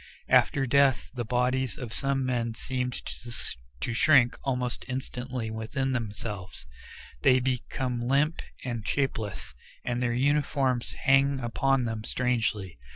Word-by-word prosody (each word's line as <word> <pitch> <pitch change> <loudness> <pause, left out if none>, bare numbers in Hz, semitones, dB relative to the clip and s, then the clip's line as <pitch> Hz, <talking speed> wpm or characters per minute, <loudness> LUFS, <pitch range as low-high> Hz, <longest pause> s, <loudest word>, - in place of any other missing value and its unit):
After 135 - +4
death 135 0 +3
the 125 -2 -2
bodies 125 +3 0
of 120 -6 -6
some 135 0 0
men 120 -3 -1
seem 125 +1 -2
to 65 - -6
shrink 125 -1 +5
almost 125 -2 -1
instantly 125 -2 -4
within 120 +5 -2
themselves; 105 - -4 0.6
they 130 - +5
become 125 -1 -2
limp 145 +5 +2 0.2
and 120 -3 -2
shapeless, 115 -7 -2 0.3
and 120 0 -1
their 120 -1 +1
uniforms 135 -2 +1
hang 135 0 +4
upon 130 +2 +1
them 110 -2 -3
strangely. 110 - -1
125 Hz, 120 wpm, -28 LUFS, 115-135 Hz, 0.6 s, shrink